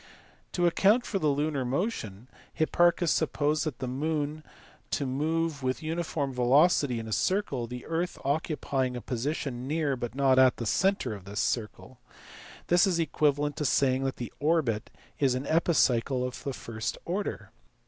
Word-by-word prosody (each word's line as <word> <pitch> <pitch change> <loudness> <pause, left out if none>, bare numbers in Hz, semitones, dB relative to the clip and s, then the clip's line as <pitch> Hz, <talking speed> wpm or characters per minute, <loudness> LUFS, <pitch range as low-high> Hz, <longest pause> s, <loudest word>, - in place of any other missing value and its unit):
To 175 - +1
account 205 +8 +4
for 195 - -2
the 155 - +1
lunar 145 -1 0
motion 125 - -3 0.3
Hipparchus 175 +1 +2
supposed 155 0 +1
the 130 - -4
moon 150 +3 -2 0.5
to 140 - -1
move 155 +3 -1
with 130 +3 -2
uniform 155 -4 -2
velocity 130 +1 +3
in 115 -1 -5
a - - -6
circle, 140 - 0
the 125 +1 -7
earth 170 +2 -2
occupying 135 -3 -1
a - - -6
position 130 0 -3
near 150 -2 0
(but 120 -1 -5
not 135 -1 +4
at) 130 -1 +5
the 115 - -4
centre 190 - +1
of 100 -3 -10
this 100 +1 -5
circle. 115 +2 -3 0.7
This 175 +2 +4
is 180 -3 +1
equivalent 145 -3 +1
to 150 - -1
saying 130 -1 +2
that 135 - -1
the 120 - -7
orbit 145 -9 +1 0.3
is 135 -3 +3
an 130 +2 -3
epicycle 135 -6 +2
of 125 - -8
the 140 - -3
first 110 -2 -5
order. 195 +4 -3
140 Hz, 160 wpm, -28 LUFS, 125-160 Hz, 0.7 s, at